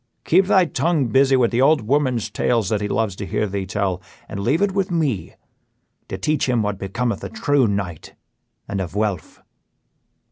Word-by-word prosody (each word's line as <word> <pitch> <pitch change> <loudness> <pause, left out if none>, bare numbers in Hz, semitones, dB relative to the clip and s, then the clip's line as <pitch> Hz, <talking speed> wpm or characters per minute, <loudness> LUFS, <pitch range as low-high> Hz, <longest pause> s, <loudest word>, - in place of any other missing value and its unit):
Keep 185 +4 +4
thy 190 -3 +5
tongue 160 -5 0
busy 135 +3 +4
with 125 -3 +2
the 120 +1 +1
old 150 +1 +4
woman's 130 -1 0
tales 115 -5 0
that 105 -2 0
he 105 - -1
loves 105 -2 -1
to - - -5
hear 105 - 0
thee 100 -1 -4
tell, 95 -1 -1 0.3
and - - -6
leave 140 - +1
it 205 - +2
with 195 0 -1
me 150 - -1 0.7
to - - -5
teach 150 -3 0
him 120 -3 +2
what 105 -1 -2
becometh 115 +5 -2
a - - -4
true 145 -4 +1
knight 100 -6 -4 0.5
and 100 -1 -3
a 90 - -2
Vuelph." 100 -2 -3
115 Hz, 185 wpm, -21 LUFS, 100-145 Hz, 0.7 s, thy